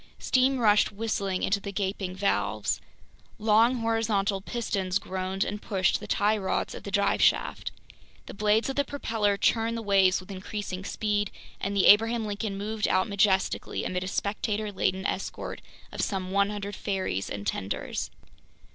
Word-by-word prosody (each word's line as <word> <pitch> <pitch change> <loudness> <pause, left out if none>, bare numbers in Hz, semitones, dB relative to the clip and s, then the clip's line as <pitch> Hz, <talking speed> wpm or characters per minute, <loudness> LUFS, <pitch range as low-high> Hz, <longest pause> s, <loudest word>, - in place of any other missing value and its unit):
Steam 260 +1 +2
rushed 210 -4 +4
whistling 200 -3 -2
into 200 +1 +2
the 200 0 -6
gaping 190 -1 -3
valves. 200 +1 0 0.6
Long 225 +3 +3
horizontal 215 -3 +1
pistons 195 -4 -1
groaned 190 0 -2
and 210 +1 -4
pushed 190 -3 +1
the - - -8
tie 210 +1 +2
rods 190 - -1
of - - -7
the - - -7
drive - - +2
shaft. - - +2 0.5
The - - -9
blades 210 +2 +2
of 270 - -3
the 285 - +4
propeller 225 -7 -1
churned 230 +2 +1
the 230 - -5
waves 195 -2 +4
with 185 +1 -11
increasing 190 0 -5
speed, 205 -1 -1 0.3
and 200 +1 -2
the 195 - +3
Abraham 225 +2 +6
Lincoln 205 -1 -3
moved 210 +1 -1
out 185 +3 +2
majestically 200 -2 +1
amid 180 0 -2
a - - -4
spectator 210 +2 -2
laden 190 0 -1
escort 195 - -4 0.3
of - - -3
some 190 -3 -2
100 200 0 0
ferries 190 - -2
and 100 0 -5
tenders. 100 -1 -3
200 Hz, 155 wpm, -27 LUFS, 190-220 Hz, 0.6 s, Abraham